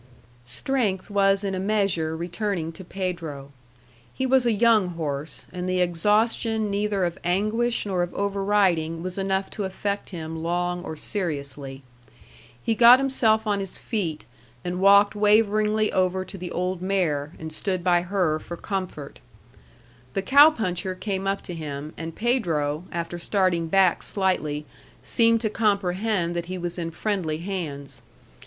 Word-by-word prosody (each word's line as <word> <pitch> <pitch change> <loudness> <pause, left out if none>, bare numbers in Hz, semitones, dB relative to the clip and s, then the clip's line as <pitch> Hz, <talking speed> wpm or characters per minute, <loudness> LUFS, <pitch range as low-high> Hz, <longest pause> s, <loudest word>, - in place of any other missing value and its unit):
Strength 210 - -1
was 195 0 +3
in 195 -1 -2
a 185 - -2
measure 190 -6 0
returning 175 0 -3
to 190 - -11
Pedro. 170 -7 -5 0.6
He 260 - -2
was 260 -1 +3
a - - +4
young 220 -2 +4
horse, 155 -3 -4
and 180 0 -3
the 185 0 +1
exhaustion 210 +5 +1
neither 200 -2 0
of 170 -1 -4
anguish 215 +7 +1
nor 190 -3 0
of 175 0 -2
over 200 0 -1
riding 170 -5 +2
was 185 +1 -4
enough 190 0 -1
to 210 - -4
affect 200 +1 -3
him 160 -3 -6
long 175 +1 -1
or 160 - -6
seriously. 140 -7 -4 0.8
He 225 - +1
got 235 +2 +8
himself 235 -5 +2
on 205 -2 +1
his 195 -2 -3
feet 175 -9 -3 0.4
and 180 +1 -2
walked 200 +1 +6
waveringly 215 0 +3
over 185 0 +1
to 195 - -10
the 180 -2 -6
old 180 +1 -2
mare, 170 -6 0
and 160 0 -7
stood 185 +1 -2
by 175 -1 +4
her 180 -4 0
for 170 +2 -8
comfort. 185 -8 -5 1.0
The 195 - 0
cow 285 +7 +8
puncher 185 - -2
came 195 0 -3
up 195 0 -1
to 175 - -7
him, 150 -2 -6
and 165 0 -6
Pedro, 170 - 0
after 170 0 -4
starting 180 -3 +1
back 190 +1 +3
slightly, 155 -7 -1 0.4
seemed 230 -1 +3
to 220 - 0
comprehend 200 -3 0
that 170 0 -3
he 185 +1 -4
was 175 0 -3
in 165 -1 -2
friendly 170 -3 -2
hands. 145 -8 -5
185 Hz, 155 wpm, -25 LUFS, 170-205 Hz, 1.0 s, got